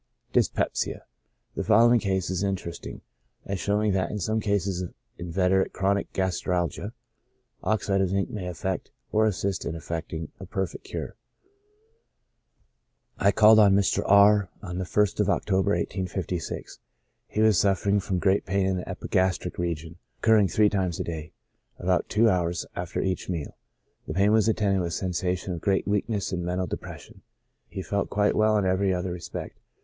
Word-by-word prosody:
Dyspepsia. - - 0 0.2
— - - -46
The - - -2
following 120 +3 +5
case 95 -3 -1
is 95 -1 -1
interesting, 95 -4 -4 0.4
as 100 -1 -3
showing 105 +2 +1
that, 95 -1 0
in 105 - -3
some 110 +3 0
cases 100 -3 0
of 90 - -6 0.2
inveterate 90 +2 +1
chronic 100 +1 0
gastralgia, 90 +1 -1 0.7
oxide 100 -2 +1
of 95 - +1
zinc 100 +1 0
may 95 -4 -5
effect, 90 +2 -3 0.2
or 110 +1 +3
assist 100 -2 -1
in 80 - -4
effecting, 80 -1 -5
a 95 - -9
perfect 95 -2 -4
cure. - - -6 2.0
I 100 - +4
called 110 +1 +7
on 100 -2 +6
Mr. 100 -1 +2
R 100 -1 +5
— - - -32
on 90 -2 -5
the 95 - -2
ist 105 -1 +2
of 105 -1 +2
October, 95 -1 +1
1856. 90 -2 -4 0.5
He 105 - -1
was 110 -4 +5
suffering 100 +1 +2
from 95 -1 -2
great 95 +2 +1
pain 95 +1 +1
in 95 -1 0
the 90 - -6
epigastric 95 -1 -1
region, 85 -1 -3 0.2
oc - - -38
curring 105 -3 +6
three 105 +3 +4
times 95 -5 -1
a - - 0
day, 80 -1 -6 0.5
about 90 0 0
two 110 +2 +4
hours 90 -4 0
after 90 0 -3
each 95 -1 -2
meal. 80 -5 -4 0.5
The 75 - -4
pain 100 +2 +4
was 110 0 +4
attended 100 -3 +2
with 85 - -1
a - - -1
sensation 90 +1 -2
of 85 - -6
great 95 -1 +1
weakness 105 -1 -1
and 90 -2 -2
mental 90 +1 -1
depression; - - -8 0.5
he 95 - -6
felt 100 +1 -1
quite 105 0 +2
well 110 0 +3
in 100 - +1
every 95 +1 +2
other 90 0 -2
respect. 85 -1 -7
95 Hz, 170 wpm, -26 LUFS, 90-100 Hz, 2.0 s, called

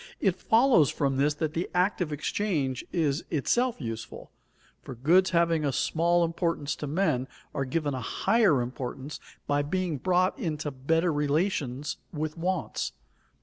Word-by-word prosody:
It 190 -4 +2
follows 220 - +4
from 140 -3 0
this 145 +2 +2
that 155 0 -2
the 170 +2 -2
act 180 +2 +2
of 160 -4 -1
exchange 150 -4 -1
is 155 -3 0
itself 240 - +1
useful, 115 -4 -6 0.5
for 130 - -8
goods 175 +10 +4
having 170 -2 +2
a 140 - +1
small 170 +5 +2
importance 165 -3 -1
to 150 - -4
men 140 -5 +1 0.3
are 135 - -1
given 145 +2 -1
a 130 - -3
higher 175 - +2
importance 130 +3 -6 0.3
by 145 0 +1
being 170 0 -2
brought 185 +2 +2
into 155 -3 -2
better 160 +6 +1
relations 145 -2 -1
with 155 -1 -3
wants. 175 - -2
155 Hz, 150 wpm, -28 LUFS, 140-180 Hz, 0.5 s, follows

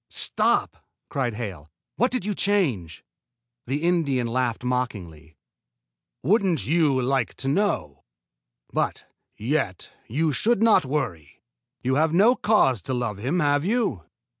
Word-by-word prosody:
"Stop!" - - 0 0.3
cried 125 -5 -2
Hale. 95 -10 -6 0.3
"What 245 - +2
did 255 -7 -3
you 210 - -1
change?" 145 - 0 0.6
The 140 +5 -2
Indian 155 -8 +1
laughed 120 0 -1
mockingly. 90 - -4 0.9
"Wouldn't 185 - +2
you 150 -4 +2
like 130 -1 0
to 135 - -4
know? 135 - -1 0.7
But, - - -1 0.3
yet, 115 - -2 0.2
you 150 +5 0
should 225 - +2
not 225 -9 +5
worry. 120 - -4 0.4
You 130 +2 +1
have 160 +1 +1
no 215 +7 +6
cause 135 - +2
to 130 - -3
love 115 -5 -3
him, 140 +11 0
have 145 0 +2
you?" 205 - 0
135 Hz, 130 wpm, -24 LUFS, 115-175 Hz, 0.9 s, no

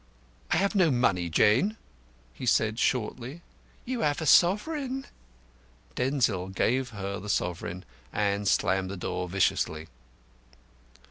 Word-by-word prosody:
"I - - +2
have 200 +2 +1
no 185 -5 +4
money, 90 - +1
Jane," 125 - +3 0.6
he 95 - -7
said 110 -1 +2
shortly. 130 +6 -2 0.4
"You 250 0 -3
have 145 -1 +1
a 160 - -3
sovereign." 260 - +3 0.9
Denzil 120 - 0
gave 125 +7 0
her 100 -3 -5
the 105 +3 -8
sovereign, 90 -1 -2 0.3
and 100 -1 0
slammed 95 0 +1
the 100 - -5
door 90 0 -3
viciously. 80 -4 0
110 Hz, 120 wpm, -28 LUFS, 95-155 Hz, 0.9 s, no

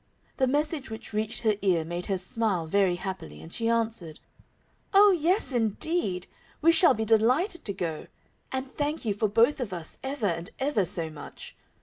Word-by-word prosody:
The 260 - +3
message 290 0 0
which 220 0 -8
reached 215 +1 -2
her 215 -2 +4
ear 180 -5 +2
made 175 +2 -4
her 195 - 0
smile 185 -1 0
very 190 +1 +2
happily, 185 - -6
and 80 +1 -12
she 230 0 -1
answered, 225 -9 -1 0.8
"Oh, 405 +1 +8
yes, 360 +2 +1
indeed, 225 - -1 0.3
we 330 +2 +5
shall 330 +2 +5
be 220 +1 -2
delighted 250 - +2
to 200 - -2
go, 170 -4 -4 0.4
and 260 0 -2
thank 290 +2 -3
you 210 - +1
for 210 +2 0
both 230 +8 +3
of 240 -6 -3
us 170 -3 -5
ever 265 -4 -3
and 170 -2 -1
ever 265 -8 +1
so 165 -2 -1
much. 150 -2 -10
220 Hz, 180 wpm, -27 LUFS, 180-270 Hz, 0.8 s, Oh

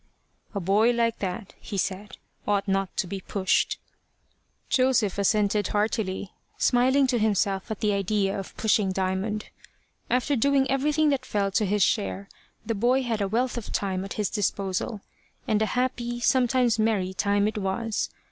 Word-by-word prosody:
"A - - 0
boy 200 +5 +3
like 235 -1 +1
that," 190 +1 -4
he 200 - -6
said, 195 +2 -3 0.3
"ought 205 0 +1
not 195 -1 -1
to - - +1
be 190 +2 -5
pushed." 190 0 0 0.9
Joseph 255 -7 +2
assented 205 0 +2
heartily, 205 -2 -1 0.2
smiling 260 +3 +3
to 250 -2 +1
himself 200 -1 +1
at 220 -1 -5
the 210 -2 +2
idea 200 0 0
of 195 - -9
pushing 205 -3 +2
Diamond. 190 +3 -2 0.6
After 255 +3 +1
doing 275 +2 +3
everything 300 +3 +2
that 275 -2 0
fell 200 -1 -1
to 210 +1 +1
his 205 0 +2
share, 200 -2 0 0.4
the 230 - -1
boy 245 +5 +2
had 230 -4 -1
a 200 - +1
wealth 240 +4 0
of 220 - -9
time 190 -2 -1
at 195 - -6
his 210 -3 -2
disposal. 200 0 -2 0.5
And 215 0 +2
a 220 - +2
happy, 240 -1 -1
sometimes 250 -2 +2
a - - +4
merry 200 -4 +1
time 200 +2 +1
it 215 0 -2
was. 210 +3 -2
210 Hz, 165 wpm, -26 LUFS, 195-240 Hz, 0.9 s, a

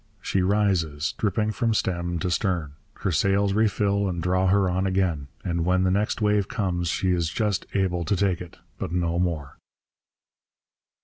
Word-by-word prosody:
She 95 - 0
rises, 90 -4 +1
dripping 105 +1 0
from 115 0 0
stem 85 -3 -1
to 90 - -1
stern. 85 -6 0 0.3
Her 95 - 0
sails 100 +4 +2
refill 100 -2 +1
and 85 -1 -3
draw 90 +2 +1
her 95 0 +3
on 95 +2 0
again. 90 -7 0 0.2
And 85 -2 0
when 90 +2 +2
the 95 - +2
next 105 +3 0
wave 105 -1 +2
comes 90 -6 -1
she 90 +3 0
is 85 -3 +1
just 105 +2 -1
able 90 -3 +1
to 100 - +1
take 95 -2 0
it 90 -2 -10 0.2
but - - -4
no 85 -1 0
more. 80 -6 -2
95 Hz, 170 wpm, -25 LUFS, 85-100 Hz, 0.3 s, her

